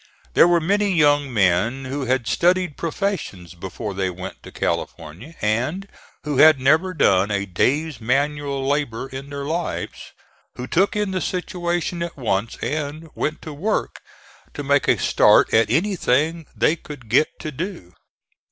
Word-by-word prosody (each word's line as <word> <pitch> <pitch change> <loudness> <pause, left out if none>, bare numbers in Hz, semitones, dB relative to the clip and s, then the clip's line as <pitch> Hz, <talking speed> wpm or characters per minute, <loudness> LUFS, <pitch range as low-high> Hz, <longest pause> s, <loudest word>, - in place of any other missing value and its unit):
There - - +6
were 175 -1 +4
many 200 +5 +1
young 145 -4 +3
men 105 +5 +1
who 135 +1 -3
had 125 -1 0
studied 180 +2 +1
professions 165 - -3
before 95 +3 -6
they 95 -1 -1
went 90 +1 -8
to - - -12
California, 85 - -4
and 130 - -1 0.4
who 150 -2 -2
had 155 -1 +7
never 160 +8 +2
done 95 -8 +3
a 100 -1 -1
day's 135 - 0
manual 140 +2 -1
labor 140 -4 -1
in 135 +1 -8
their 140 -1 -5
lives, 165 +4 -4 0.4
who 125 - -5
took 185 +10 +1
in 210 -2 0
the 185 -1 -2
situation 175 0 -2
at 170 -2 -4
once 110 -3 -1
and 155 +1 -4
went 155 - -3
to 155 - -7
work 200 +10 -2 0.5
to 145 - -4
make 140 0 +2
a - - +4
start - - +4
at 115 -1 +4
anything 160 - +1
they 160 - +2
could 145 -7 -11
get 130 +8 +4
to 155 - -5
do. 150 - -6
145 Hz, 155 wpm, -22 LUFS, 115-170 Hz, 0.5 s, had